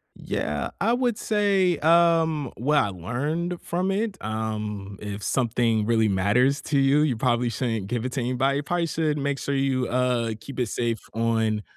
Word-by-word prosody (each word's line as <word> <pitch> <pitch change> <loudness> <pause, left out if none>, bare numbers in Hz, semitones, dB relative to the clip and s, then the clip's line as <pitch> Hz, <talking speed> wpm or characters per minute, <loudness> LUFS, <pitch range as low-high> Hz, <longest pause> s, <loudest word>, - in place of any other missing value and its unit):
Yeah, 75 0 -3
I 220 +4 +3
would 245 -3 0
say, 200 -5 +2
um, 160 -3 +3
what 150 +5 +1
I 105 - +3
learned 145 - -3
from 180 +3 -1
it, 205 0 -1
um, 105 -2 -4
if 105 -1 -6
something 115 -3 +1
really 110 -1 +2
matters 105 +9 +2
to 150 - 0
you, 135 +2 +4
you 140 -5 +1
probably 120 +1 +1
shouldn't 115 -4 -2
give 120 +1 -2
it 130 - -2
to 140 - -2
anybody. 130 +3 +1
You 145 - -2
probably 175 +2 -1
should 155 -2 0
make 140 -1 -1
sure 140 - -2
you, 135 -2 +1
uh, 125 -2 0
keep 140 -2 -8
it 125 - +1
safe 115 0 -1
on, 110 -2 0
130 Hz, 180 wpm, -25 LUFS, 110-155 Hz, -, you